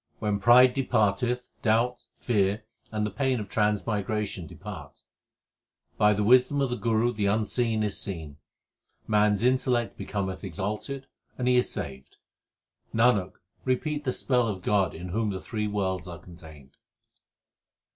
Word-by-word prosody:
When 105 -1 -1
pride 125 +4 +7
departeth, 125 -1 0
doubt, 115 +2 +1
fear, 105 -3 0 0.3
and 105 -1 -1
the 105 - -3
pain 130 +2 0
of 105 - -5
trans 105 -2 +1
migration 105 -4 -2
depart. - - -10 1.0
By 105 0 +5
the 105 +1 0
wisdom 130 +5 +5
of 135 -3 +1
the - - 0
Guru 115 +1 +1
the 105 -3 0
Unseen 110 +2 0
is 105 -2 -1
seen, 80 -8 -5 0.7
Man 105 -1 +4
s 105 - -2
intellect 125 -2 +1
becometh 95 -1 -3
exalted, 105 - -4 0.3
and 125 - -1
he 125 - +4
is 125 - +3
saved. 65 -2 -6 0.8
Nanak, 115 -5 +3 0.3
repeat 145 +3 -1
the 130 - 0
spell 125 -2 +1
of 95 -4 -4
God 100 -4 +1
in 90 +3 -7
whom 110 +4 0
the 95 -2 -3
three 105 +2 -3
worlds 95 -3 -2
are 85 -2 -7
contained. 80 -5 -14
105 Hz, 145 wpm, -27 LUFS, 100-125 Hz, 1.0 s, pride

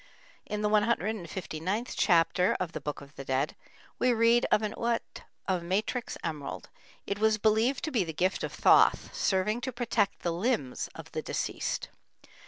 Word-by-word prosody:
In 210 0 -3
the 210 - +2
159th 205 -2 -1
chapter 180 -1 +3
of 180 -3 -2
the - - -6
Book 150 -1 -4
of 140 +1 -14
the 135 - -5
Dead, 130 0 -1 0.4
we 250 - +4
read 235 +1 +4
of 215 - +4
an 210 - -2
uat 235 0 -2 0.3
of 185 -2 +1
matrix 205 +8 -2
emerald; 150 -4 -5 0.4
it 200 - -3
was 220 0 +3
believed 220 +5 +2
to 310 - -2
be 230 -8 +2
the 165 - -4
gift 180 +4 0
of - - -2
Thoth, - - +4
serving 210 +5 +1
to 260 +1 -3
protect 230 -4 0
the 170 - 0
limbs 175 - -1
of - - -10
the - - -3
deceased. - - -3
205 Hz, 170 wpm, -29 LUFS, 170-230 Hz, 0.4 s, we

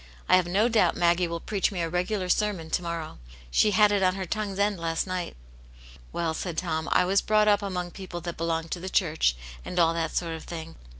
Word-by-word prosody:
I - - +6
have 185 -1 +3
no 200 +6 +3
doubt 220 -7 +2
Maggie 175 0 +3
will 170 0 -4
preach 200 +3 -1
me 190 - -4
a - - 0
regular 180 +3 -1
sermon 180 -4 0
to - - +1
morrow. 170 - -5 0.3
She 210 - +4
had 210 +1 +5
it 200 -1 +2
on 185 -1 +3
her 190 -1 -3
tongue's 205 +1 -3
end 200 -2 +1
last 165 -1 -1
night." 185 -2 -4 0.4
" - - -20
Well," 165 -2 -1
said 165 0 -4
Tom, 160 -2 -2
" - - -7
I 180 - +4
was 195 +2 +3
brought 215 0 +3
up 205 0 +4
among 180 -3 -3
f)eople 175 -2 -7
that 175 -1 -4
belong 165 0 -2
to 175 - -3
the 185 +2 -5
church, 160 - +2 0.3
and 180 - -7
all 165 -1 +4
that 165 -1 -2
sort 170 -2 -1
of 160 - -7
thing. 165 -1 -7
175 Hz, 240 wpm, -27 LUFS, 165-195 Hz, 0.4 s, I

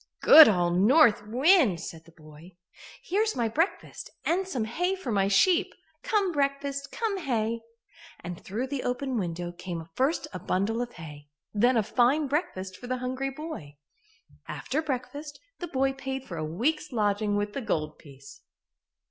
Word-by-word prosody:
"Good 315 - +10
old 175 -3 +1
North 225 -1 +5
Wind!" 260 - +4
said 165 -1 -8
the 170 - -17
boy. 160 +2 -16 0.5
"Here's 430 +4 0
my 235 -2 0
breakfast 325 - -2 0.2
and 370 +3 +1
some 250 -11 -2
hay 355 +12 -1
for 325 -11 -5
my 195 -2 +2
sheep. 345 - +3 0.3
Come 420 -6 +1
breakfast, 280 -1 -2
come 435 -4 -2
hay," 230 -6 -1 0.6
and 175 0 -8
through 220 +7 -3
the 265 0 -4
open 255 +1 -2
window 175 -1 -4
came 175 -2 -6
first 270 - 0
a 185 - -5
bundle 205 +7 -1
of 245 0 -5
hay, 150 -3 -11 0.2
and 205 - -2
then 245 +1 +4
a 220 - +3
fine 255 +8 +2
breakfast 190 - -3
for 245 - -10
the 255 +1 -1
hungry 255 +2 -3
boy. 270 - -8 0.7
After 300 +4 -3
breakfast, 285 +1 -5 0.2
the 350 - -4
boy 270 -3 0
paid 270 -1 -5
for 180 - -8
a 160 - -3
week's 275 - -1
lodging 210 -2 0
with 205 0 -2
the 275 - -3
gold 155 -9 -2
piece. 140 -2 -14
245 Hz, 165 wpm, -27 LUFS, 185-285 Hz, 0.7 s, Good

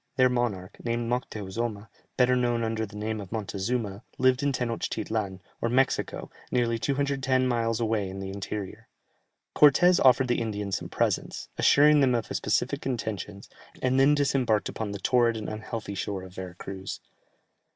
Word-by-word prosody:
Their 130 -1 +5
monarch, 110 -6 -2
named 120 0 -1
Moctheuzoma, 110 -2 -3 0.3
better 125 0 +4
known 120 -2 +1
under 110 -1 -1
the 100 - -13
name 110 +1 -3
of 95 - -10
Montezuma, 105 0 -2 0.2
lived 130 +1 +3
in 140 0 +1
Tenochtitlan, 110 -5 -2 0.2
or 115 - +1
Mexico, 130 +2 0 0.2
nearly 120 -2 +1
210 135 +1 +1
miles 115 -2 0
away 110 -4 0
in 95 +1 -7
the 95 0 -5
interior. 100 0 -6 0.7
Cortès 175 +5 +6
offered 130 0 +5
the 120 -1 +1
Indians 105 -4 -2
some - - -8
presents, - - -1
assuring 150 +1 +6
them 130 -3 +4
of 115 -3 -2
his - - -2
pacific - - 0
intentions, 105 -5 -4 0.3
and 130 +1 +2
then 140 +2 +5
disembarked 130 -6 +1
upon 110 -2 -4
the 100 - -4
torrid 115 +2 +2
and 110 - -5
unhealthy 110 -1 -5
shore 100 -1 -3
of 95 -1 -11
Vera 95 -1 -7
Cruz. 95 +1 -6
115 Hz, 160 wpm, -27 LUFS, 100-125 Hz, 0.7 s, Cortès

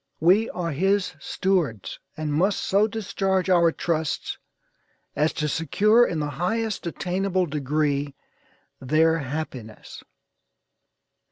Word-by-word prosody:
We 190 +8 +4
are 170 -2 -3
his 195 +5 +1
stewards, 155 - -1 0.2
and 155 -1 -2
must 190 +7 +2
so 200 +3 +2
discharge 195 -4 -1
our 170 -2 +5
trust 160 -2 -2 0.8
as 155 +1 +2
to 150 - -2
secure 210 - +3
in 165 - -2
the 150 -1 -2
highest 220 0 -1
attainable 185 +2 -1
degree 145 -1 -1 0.6
their 160 +5 +2
happiness." 130 -6 -7
165 Hz, 105 wpm, -24 LUFS, 150-195 Hz, 0.8 s, our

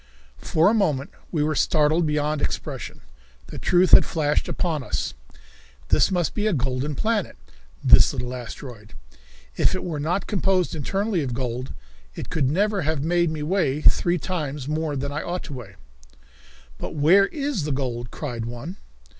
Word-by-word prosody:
For 160 +1 +2
a 210 - +4
moment 155 -11 0 0.2
we 155 -4 +1
were 155 +1 +1
startled 155 +2 +2
beyond 150 0 0
expression. - - -4 0.4
The - - -8
truth 180 +1 +3
had - - +9
flashed 150 -2 0
upon 160 -5 -1
us. 70 - -3 0.8
This - - +4
must 175 -4 0
be 210 +1 0
a 215 - +2
golden 135 +1 -1
planet 215 - -1 0.5
this - - +7
little 125 0 -4
asteroid. 120 -3 -9 0.6
If - - +3
it 185 - -4
were 160 -4 -3
not 175 +6 -1
composed 190 -3 +1
internally 195 +5 -1
of 125 -4 -3
gold 125 0 -4 0.4
it - - -7
could 140 -5 +1
never 200 +5 +1
have 155 -2 -1
made 170 +1 +2
me 155 -1 -4
weigh 155 -4 0
three 175 +3 +4
times 150 -6 -4
more 155 0 -1
than 140 +1 -3
I 150 +2 -3
ought 180 +1 -4
to 145 - -8
weigh. 115 -7 -9 1.0
"But - - -6
where 175 +7 +5
is 275 - -2
the 150 - -2
gold?" 120 -3 -3
cried 120 -6 -5
one. 120 - -7
150 Hz, 165 wpm, -24 LUFS, 135-180 Hz, 1.0 s, had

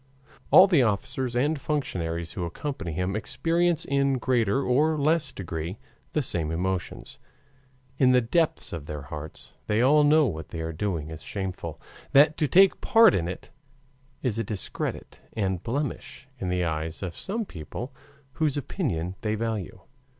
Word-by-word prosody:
All 185 - +9
the 175 -8 +4
officers 120 +3 0
and 145 +4 +1
functionaries 85 - -2
who 90 - -3
accompany 100 - -4
him 90 +4 -1
experience 165 +9 0
in 140 -1 +1
greater 125 0 +1
or 150 +6 +2
less 150 -1 +1
degree 85 -2 -5 0.4
the 150 - +1
same 85 -9 -1
emotions. 90 +2 -3 0.8
In 130 -2 +5
the 125 - +6
depths 155 - 0
of 75 -4 -6
their 75 -2 -5
hearts 75 +2 -8
they 105 +1 +1
all 145 +5 +5
know 150 +1 +5
that 120 - 0
what 80 0 -8
they 80 - -5
are 80 0 -4
doing 80 -3 -3
is 80 - -8
shameful, 95 -5 -5 0.3
that 150 +2 +6
to 150 - +1
take 190 +5 +5
part 225 -2 +6
in 85 -2 0
it 90 - -7 0.7
is 115 -4 0
a - - +1
discredit 100 -2 -5
and 95 -4 -1
blemish 135 +2 -4
in 95 - -2
the 90 0 0
eyes 80 +2 -3
of 90 -3 -4
some 220 +3 -3
people 115 - -7 0.4
whose 150 0 0
opinion 100 - -2
they 110 0 0
value. 110 -4 -3
110 Hz, 160 wpm, -26 LUFS, 85-145 Hz, 0.8 s, All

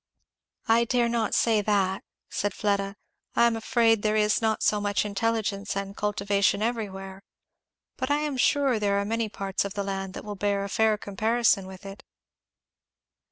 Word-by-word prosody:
"I 230 +1 +4
dare 240 0 +2
not 230 -2 0
say 225 -2 +3
that," 195 -2 0 0.2
said 205 -1 -2
Fleda. 200 -1 -1 0.4
"I 235 - +5
am 235 -1 +2
afraid 225 -1 +2
there 215 0 +1
is 210 +1 +2
not 220 -1 0
so 210 -1 +2
much 205 0 0
intelligence 210 -1 -1
and 195 0 -4
cultivation 200 0 +1
everywhere. 195 -4 -4 0.8
But 260 +1 -2
I 290 - +3
am 300 -2 -2
sure 265 -2 +2
there 200 -1 +1
are 200 - -1
many 225 +1 -1
parts 195 -1 -2
of 200 0 -6
the 200 - -1
land 195 -1 -4
that - - -7
will 210 - -5
bear 200 0 -1
a 200 - -5
fair 220 +1 +2
comparison 215 0 +1
with 190 +1 -11
it." 195 +1 -9
210 Hz, 170 wpm, -26 LUFS, 200-225 Hz, 0.8 s, I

